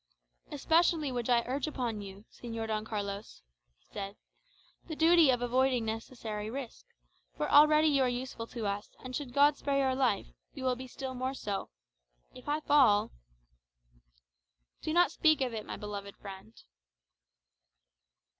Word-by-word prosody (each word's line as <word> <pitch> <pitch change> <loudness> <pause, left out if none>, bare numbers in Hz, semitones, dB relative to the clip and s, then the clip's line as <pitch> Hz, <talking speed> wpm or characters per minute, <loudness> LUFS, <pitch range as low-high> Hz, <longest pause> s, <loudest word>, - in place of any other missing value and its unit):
"Especially 320 0 +2
would 245 -1 -3
I 235 -1 +4
urge 270 +4 -2
upon 240 -7 -3
you, 200 +1 -10
Señor 230 -2 -6
Don 215 -1 -1
Carlos," 200 - -5 0.3
he - - -36
said, 200 0 -5 0.7
"the 320 - -5
duty 325 -1 +5
of 245 -1 +2
avoiding 255 0 +2
unnecessary 220 -1 -5
risk, 260 0 -7 0.5
for - - -1
already 305 +1 +6
you 280 -2 +3
are 255 - +3
useful 245 -2 -5
to 230 -3 -5
us; 200 +1 -3
and 255 0 -6
should 280 -4 -4
God 285 +2 +4
spare 280 -1 -1
your 265 -1 +2
life, 260 - +1 0.3
you - - -6
will 255 -1 +1
be 260 +1 -8
still 260 +1 -6
more 255 +1 -3
so. 205 -6 -4 0.6
If - - -10
I 300 +1 0
fall 260 -9 +4 0.8
" - - -39
"Do 315 - -3
not 350 +2 +4
speak 310 -2 +3
of 255 -3 -1
it, 215 -1 -5
my - - -5
beloved 200 -1 -7
friend." 190 - -10
245 Hz, 155 wpm, -31 LUFS, 210-275 Hz, 0.8 s, already